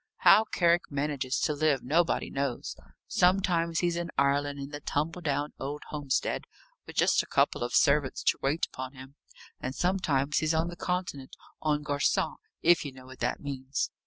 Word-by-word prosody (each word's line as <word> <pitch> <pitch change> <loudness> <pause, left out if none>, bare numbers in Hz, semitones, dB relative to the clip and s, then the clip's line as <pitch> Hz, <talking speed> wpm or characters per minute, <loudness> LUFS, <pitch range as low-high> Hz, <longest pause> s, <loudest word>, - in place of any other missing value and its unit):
How 220 - +7
Carrick 175 -4 +2
manages 140 -2 -1
to 150 - +1
live 145 -3 +1
nobody 160 +6 +1
knows. 135 -3 -3 0.3
Sometimes 180 -3 +2
he's 175 -1 +1
in 170 0 -3
Ireland, 140 +1 +2
in 140 0 -6
the 145 - -5
tumble 160 +5 -2
down 145 -1 -1
old 145 +2 -5
homestead, 145 -3 -1 0.4
with - - -10
just - - +4
a - - -11
couple - - +2
of 120 - -2
servants 140 -1 +3
to - - +2
wait 145 +4 +1
upon 130 +1 -7
him; 130 0 -12 0.5
and 130 +1 -4
sometimes 150 -7 +1
he's 160 0 +1
on 165 +2 +1
the 175 - -7
Continent, 175 -8 -3 0.3
en 150 -1 +1
garçon 145 -1 0 0.3
if 175 0 +5
you 145 - -5
know 130 -1 -14
what 130 0 -12
that 120 +1 -1
means. 135 -1 -3
145 Hz, 175 wpm, -29 LUFS, 135-170 Hz, 0.5 s, How